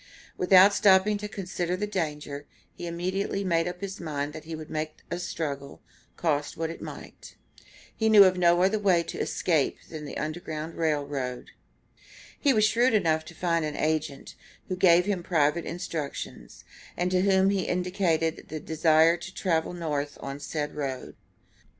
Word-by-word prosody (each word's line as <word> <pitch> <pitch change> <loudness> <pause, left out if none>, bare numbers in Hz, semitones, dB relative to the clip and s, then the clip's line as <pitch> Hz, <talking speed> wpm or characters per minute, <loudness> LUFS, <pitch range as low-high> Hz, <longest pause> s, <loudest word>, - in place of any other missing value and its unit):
Without 190 +2 +6
stopping 200 +1 +4
to 210 - -4
consider 180 -3 -3
the 210 - -1
danger, 150 -7 -4 0.3
he 175 - -7
immediately 185 +3 -2
made 165 -3 +1
up 180 +1 -6
his 195 0 -5
mind 150 -3 -3
that 155 0 -9
he 165 0 -5
would 155 -1 -9
make 155 0 -3 0.2
a 175 - -2
struggle, 145 -6 -4 0.4
cost 150 -3 -1
what 165 0 -2
it 165 - -10
might. - - -10 0.6
He 220 -1 +1
knew 210 -2 +9
of 185 -1 +4
no 175 0 +4
other 205 +3 +2
way 190 -4 +3
of 170 - -7
escape 160 -6 0
than 155 -2 -6
the - - -6
Underground 155 0 -4
Rail 155 -3 0
Road. 130 -3 -5 0.9
He 285 - +3
was 215 -4 +4
shrewd 230 +2 +3
enough 160 -6 +2
to 175 - -12
find 170 -1 0
an 150 -1 -3
agent, 155 -3 -2 0.4
who 185 - -1
gave 180 -1 +5
him 200 -3 -1
private 160 -1 +1
instructions, 165 -4 -6 0.3
and 180 +1 0
to 180 0 +3
whom 190 0 +4
he 195 -2 0
indicated 180 -4 -1
a 155 - -4
desire 160 +2 +3
to 175 +3 -9
travel 165 -4 0
North 150 -4 -3
on 140 +1 -6
said 150 +1 -4
road. 135 -3 -5
170 Hz, 170 wpm, -27 LUFS, 155-185 Hz, 0.9 s, knew